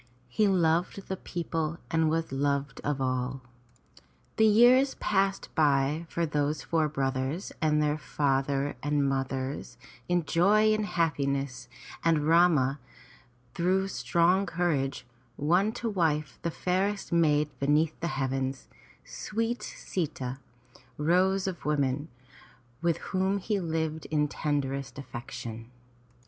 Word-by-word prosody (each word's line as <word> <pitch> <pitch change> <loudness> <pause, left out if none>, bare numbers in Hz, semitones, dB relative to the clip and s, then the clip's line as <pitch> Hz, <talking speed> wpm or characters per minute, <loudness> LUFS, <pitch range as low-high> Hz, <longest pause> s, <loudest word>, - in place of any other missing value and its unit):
He 210 - +2
loved 180 +1 +1
the 190 - -1
people 165 -3 -3
and 160 -1 +2
was 165 -1 -1
loved 140 0 -1
of 145 -1 -1
all. 130 0 -1 1.0
The 220 - +6
years 245 +5 +5
passed 195 -1 0
by 150 +1 +2
for 170 - 0
those 150 0 -1
four 160 -2 +1
brothers 135 +4 -2
and 150 -1 +3
their 150 +1 0
father 140 -1 0
and 145 -1 +1
mothers 135 -2 -3 0.3
in 175 -2 +1
joy 210 +7 +4
and 215 -1 -1
happiness, 140 -7 -1 0.3
and 160 -3 +2
Rama, 160 -5 +4 0.7
through 190 +2 +1
strong 180 +2 +2
courage, 155 -8 -1 0.3
won 180 +8 +2
to 235 - -4
wife 160 -8 0
the 170 - -1
fairest 190 +4 -1
maid 150 -3 +3
beneath 150 +3 +2
the 170 - -2
heavens, 135 0 -2 0.4
sweet 230 +2 -3
Si'ta, 135 -7 -4 0.6
Rose 185 +5 +2
of 190 -2 -4
Women, 145 -1 0 0.7
with 170 -1 +1 0.2
whom 190 +1 +1
he 200 +1 -1
lived 160 -2 -2
in 150 -1 +1
tenderest 140 -3 -2
affection. 120 -3 -7
155 Hz, 120 wpm, -28 LUFS, 140-180 Hz, 1.0 s, The